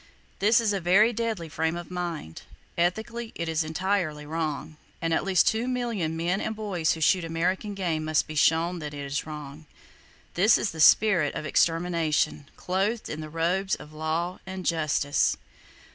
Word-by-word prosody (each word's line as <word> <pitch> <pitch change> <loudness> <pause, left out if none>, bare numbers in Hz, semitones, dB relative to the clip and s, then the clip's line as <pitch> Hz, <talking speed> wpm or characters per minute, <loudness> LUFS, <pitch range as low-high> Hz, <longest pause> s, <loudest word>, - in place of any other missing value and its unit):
This 215 +3 +4
is 220 -3 +1
a 195 - -2
very 200 +7 +4
deadly 225 -7 -2
frame 160 +1 -1
of 175 +1 -8
mind. 170 - -5 0.3
Ethically 220 +7 -1
it 170 - -3
is 160 0 0
entirely 160 -2 -1
wrong; 155 -1 -3 0.2
and 165 -1 -1
at - - +1
least 190 -3 +3
two 225 +3 +1
million 230 -11 -2
men 175 +4 0
and 220 - -3
boys 190 -7 0
who 160 - -7
shoot 180 +4 +3
American 180 +5 -1
game 170 -5 -1
must 155 -1 +2
be 155 - -8
shown 165 +3 +2
that 150 -2 -6
it 145 -1 -5
is 140 +2 -3
wrong! 150 0 -8 0.7
This 205 +6 +5
is 200 - -1
the 160 - -9
spirit 170 -2 +5
of - - -4
Extermination, 165 -3 +1
clothed 200 +5 -1
in 155 - -5
the 155 - -7
robes 180 +5 0
of 150 +2 -13
Law 160 +3 -2
and 190 -1 -6
Justice. 150 -3 +1
170 Hz, 175 wpm, -26 LUFS, 155-195 Hz, 0.7 s, This